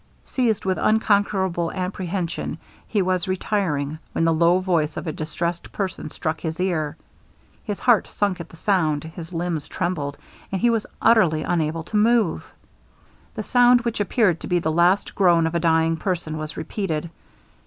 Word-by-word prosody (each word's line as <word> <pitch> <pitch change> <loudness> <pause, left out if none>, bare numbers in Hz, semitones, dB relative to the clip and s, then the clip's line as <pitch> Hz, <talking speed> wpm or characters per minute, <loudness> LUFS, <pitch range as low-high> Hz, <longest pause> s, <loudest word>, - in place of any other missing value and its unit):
Seized 225 -6 0
with 185 -1 0
unconquerable 200 -5 +2
apprehension, 185 -1 -3 0.3
he 205 -4 +1
was 185 0 0
retiring, 170 -6 -1
when 165 - +1
the 165 - +3
low 170 +2 +4
voice 170 -5 0
of - - -4
a 160 - -2
distressed 170 +3 -4
person 195 -2 -4
struck 160 -1 -3
his 160 0 -4
ear. 165 -5 -1 0.7
His 205 -3 -4
heart 240 -4 +4
sunk 200 -3 -1
at - - -10
the 165 - -14
sound, 160 -6 +1
his 165 +1 -9
limbs 165 -3 -2
trembled, 150 -6 -3 0.3
and 190 - -1
he 240 +3 +3
was 225 -2 -1 0.2
utterly 180 -9 +4
unable 165 -1 -1
to 210 - -2
move. 220 -4 +2 0.8
The - - -3
sound 245 -1 +5
which 235 -2 -2
appeared 205 -4 +2
to - - -7
be 180 - +2
the 160 -2 0
last 175 +5 +2
groan 175 -4 +4
of 160 - -1
a 170 - +1
dying 165 0 +2
person, 170 -2 -2
was 155 0 -6
repeated. 170 -5 -3
175 Hz, 165 wpm, -23 LUFS, 160-200 Hz, 0.8 s, sound